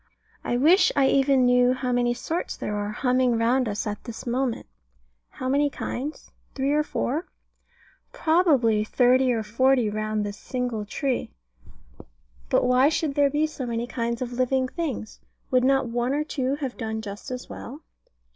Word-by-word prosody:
I 240 Hz, -, 0 dB
wish 325 Hz, +10 st, +5 dB
I 275 Hz, -1 st, +4 dB
even 270 Hz, -2 st, +3 dB
knew 250 Hz, 0 st, +4 dB
how 255 Hz, -1 st, -2 dB
many 245 Hz, 0 st, +1 dB
sorts 330 Hz, +7 st, -4 dB
there 210 Hz, -, -3 dB
are 205 Hz, 0 st, -2 dB
humming 250 Hz, +1 st, +1 dB
round 240 Hz, +1 st, +2 dB
us 205 Hz, +2 st, -3 dB
at 210 Hz, -1 st, -5 dB
this 235 Hz, -2 st, -8 dB
moment. 245 Hz, 0 st, -1 dB, 0.6 s
How 255 Hz, -, -6 dB
many 285 Hz, +2 st, +2 dB
kinds? 280 Hz, +2 st, -6 dB, 0.2 s
Three 275 Hz, +1 st, 0 dB
or 300 Hz, +1 st, +3 dB
four? 300 Hz, -, -2 dB
More 320 Hz, +5 st, -2 dB, 0.9 s
probably 285 Hz, -11 st, +3 dB
thirty 250 Hz, +3 st, +3 dB
or 225 Hz, -2 st, -1 dB
forty 240 Hz, +1 st, +2 dB
round 215 Hz, 0 st, -2 dB
this 205 Hz, 0 st, -5 dB
single 245 Hz, -5 st, -3 dB
tree. 260 Hz, +4 st, -2 dB, 1.2 s
But -, -, +3 dB
why 250 Hz, +3 st, +4 dB
should 310 Hz, -2 st, -1 dB
there 285 Hz, 0 st, +3 dB
be 295 Hz, +2 st, +1 dB
so 285 Hz, -5 st, -5 dB
many 235 Hz, 0 st, -2 dB
kinds 235 Hz, 0 st, -3 dB
of 245 Hz, -1 st, -6 dB
living 255 Hz, +1 st, +1 dB
things? 275 Hz, -8 st, -5 dB, 0.3 s
Would 255 Hz, -1 st, +3 dB
not 270 Hz, -1 st, +3 dB
one 240 Hz, +3 st, -1 dB
or 300 Hz, -, 0 dB
two 275 Hz, -3 st, -2 dB
have 275 Hz, -4 st, -5 dB
done 220 Hz, -1 st, -4 dB
just 200 Hz, 0 st, -8 dB
as 250 Hz, 0 st, -6 dB
well? 285 Hz, +6 st, -9 dB
255 Hz, 170 wpm, -25 LUFS, 235-275 Hz, 1.2 s, wish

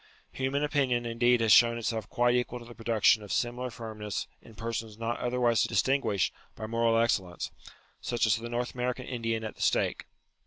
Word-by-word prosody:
Human 135 Hz, +2 st, -1 dB
opinion 135 Hz, -5 st, +1 dB
indeed 120 Hz, +1 st, +2 dB
has 110 Hz, -1 st, +3 dB
shown 115 Hz, 0 st, +6 dB
itself 110 Hz, -2 st, -3 dB
quite 120 Hz, 0 st, +2 dB
equal 125 Hz, 0 st, 0 dB
to 120 Hz, -, -11 dB
the 120 Hz, -, -11 dB
production 115 Hz, -2 st, +3 dB
of 105 Hz, -, -9 dB
similar 125 Hz, +1 st, -1 dB
firmness 110 Hz, -3 st, -5 dB, 0.2 s
in 115 Hz, -, -16 dB
persons 115 Hz, -1 st, -4 dB
not 115 Hz, +1 st, -3 dB
otherwise 120 Hz, -2 st, +2 dB
distinguished 115 Hz, -8 st, +1 dB, 0.2 s
by 110 Hz, -, -6 dB
moral 115 Hz, 0 st, +2 dB
excel 110 Hz, -5 st, +2 dB
lence; 85 Hz, -, -6 dB, 0.5 s
such 120 Hz, -1 st, 0 dB
as 110 Hz, -, +4 dB
the 115 Hz, +1 st, -6 dB
North 120 Hz, +1 st, -2 dB
American 125 Hz, 0 st, -2 dB
Indian 115 Hz, -3 st, -2 dB
at 110 Hz, -, -5 dB
the -, -, -12 dB
stake. -, -, +1 dB
115 Hz, 185 wpm, -29 LUFS, 115-125 Hz, 0.5 s, shown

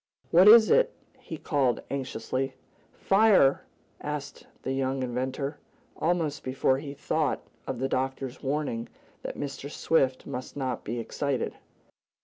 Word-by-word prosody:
"What 180 Hz, +4 st, +7 dB
is 220 Hz, 0 st, +9 dB
it?" -, -, +5 dB, 0.3 s
he -, -, -7 dB
called 135 Hz, -6 st, 0 dB
anxiously. 130 Hz, 0 st, -3 dB, 0.4 s
"Fire!" 195 Hz, -9 st, +4 dB, 0.4 s
answered -, -, -6 dB, 0.2 s
the 135 Hz, -, -1 dB
young 135 Hz, 0 st, -1 dB
inventor, 130 Hz, +4 st, -3 dB, 0.4 s
almost 165 Hz, -3 st, 0 dB
before 130 Hz, 0 st, +1 dB
he 140 Hz, -1 st, -7 dB
thought 150 Hz, +1 st, -1 dB, 0.2 s
of 130 Hz, -, -3 dB
the 130 Hz, +2 st, -1 dB
doctor's 135 Hz, -1 st, -2 dB
warning 135 Hz, -5 st, -2 dB, 0.3 s
that -, -, -6 dB
Mr. 140 Hz, 0 st, -5 dB
Swift 135 Hz, -4 st, +1 dB
must 125 Hz, +3 st, -6 dB
not 130 Hz, -2 st, -2 dB
be 120 Hz, +3 st, -4 dB
excited. 135 Hz, +2 st, -2 dB
135 Hz, 130 wpm, -28 LUFS, 130-150 Hz, 0.4 s, is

